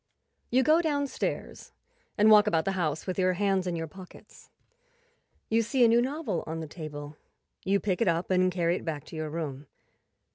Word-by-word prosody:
You 260 +2 +3
go 315 +4 +4
downstairs 285 -4 -3 0.4
and 215 0 +5
walk 210 0 +7
about 165 -6 +1
the 195 - +1
house 160 -5 -2
with 185 0 -3
your 185 0 +3
hands 195 0 0
in 175 - -1
your 165 -1 -3
pockets. 180 +4 -14 1.0
You 225 +1 +2
see 240 +2 +3
a - - +6
new 230 +1 +4
novel 255 - -2
on 160 +1 -4
the 160 - -5
table; 150 -2 -8 0.5
you 200 +1 +2
pick 195 +1 -2
it 230 - +2
up 170 +2 0
and 185 0 +3
carry 175 -1 0
it - - -9
back 150 -4 -4
to - - -12
your 155 -1 -4
room. 150 -3 -5
185 Hz, 190 wpm, -28 LUFS, 160-220 Hz, 1.0 s, walk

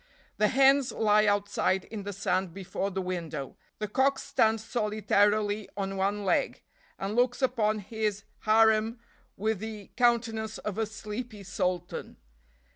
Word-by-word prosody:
The 210 - +5
hens 270 +2 +4
lie 210 -1 +3
outside 205 -2 +1
in 215 -2 -7
the 200 +1 -5
sand 185 -2 -1
before 195 0 -3
the 190 -1 -3
window, 165 -6 -4 0.2
the 210 - -3
cock 270 +6 +2
stands 225 -6 +1
solitarily 210 -2 +1
on 195 -1 -2
one 200 +1 -1
leg, 180 - 0 0.3
and 195 +2 -3
looks 245 0 +2
upon 230 -5 +1
his 210 0 -3 0.2
harem 220 +1 +3 0.4
with 215 0 0
the 215 -2 -7
countenance 230 -3 +1
of 210 0 -4
a 220 - +1
sleepy 215 +1 -7
sultan. 180 -2 -3
210 Hz, 135 wpm, -29 LUFS, 195-225 Hz, 0.4 s, The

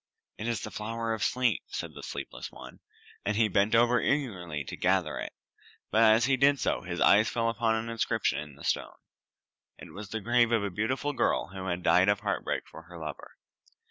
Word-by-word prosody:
"It 110 - -3
is 115 -2 -1
the 105 - -6
flower 115 +1 -3
of 110 - -3
sleep," 125 -3 +1
said - - -5
the - - -10
sleepless - - -7
one, - - -12 0.4
and 105 0 -1
he 115 -1 +4
bent 100 +3 +2
over 120 +1 +4
eagerly 95 - -1
to - - -7
gather 90 -4 +1
it; - - -5 0.6
but 110 - +3
as 110 +1 +6
he 135 0 +2
did 140 +1 +4
so - - 0
his 90 -1 -5
eyes 105 +2 +5
fell 115 -1 0
upon 115 0 +1
an 110 +1 -3
inscription 115 - 0
on 75 -2 -10
the 70 - -14
stone. - - -1 0.8
It - - -12
was 100 0 -8
the 110 - -3
grave 120 +2 +3
of 115 -3 +2
a 100 - -2
beautiful 130 +9 -1
girl 130 - 0
who 95 0 -7
had 90 -1 -2
died 90 +3 +5
of 100 0 +2
heart - - -1
break - - -3
for 80 - -11
her 85 +1 -11
lover. 75 -3 -8
110 Hz, 210 wpm, -29 LUFS, 95-115 Hz, 0.8 s, as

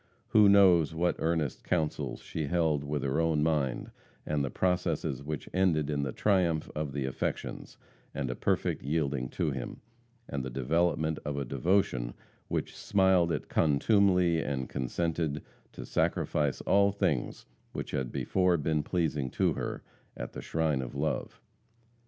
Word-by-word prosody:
Who 105 -2 +6
knows 90 -5 +5
what 85 +1 +1
earnest 80 -4 -1
councils 80 -4 -1
she 80 -3 -4
held 80 -3 +1
with 70 -1 -2
her 70 +4 +1
own 80 -2 +2
mind 75 -5 0 0.3
and 75 -2 0
the 70 - -1
processes 85 -6 0
which 75 -1 -5
ended 80 -6 +2
in 70 -1 0
the 70 -2 -2
triumph 90 -5 +1
of 75 -2 -3
the 70 -1 -2
affections, 65 - -4 0.3
and - - -3
a - - -2
perfect - - 0
yielding 70 -3 -1
to - - +1
him, - - -5 0.5
and 70 -2 -3
the 65 - -4
development 80 +4 0
of 75 -1 -3
a 70 - -2
devotion 65 -4 0 0.3
which - - -3
smiled 95 -4 +3
at - - -2
contumely 90 +2 +3
and 65 -4 -3
consented 80 +2 -2 0.3
to - - -7
sacrifice 75 -3 0
all 100 0 +4
things 95 -11 -1 0.3
which - - -5
had 65 -2 -2
before 90 -2 +2
been 75 0 0
pleasing 75 -5 -1
to - - +1
her, - - -4 0.3
at - - -6
the - - -6
shrine 80 -4 0
of 65 +1 -7
love? 75 +2 -2
80 Hz, 150 wpm, -30 LUFS, 70-85 Hz, 0.5 s, Who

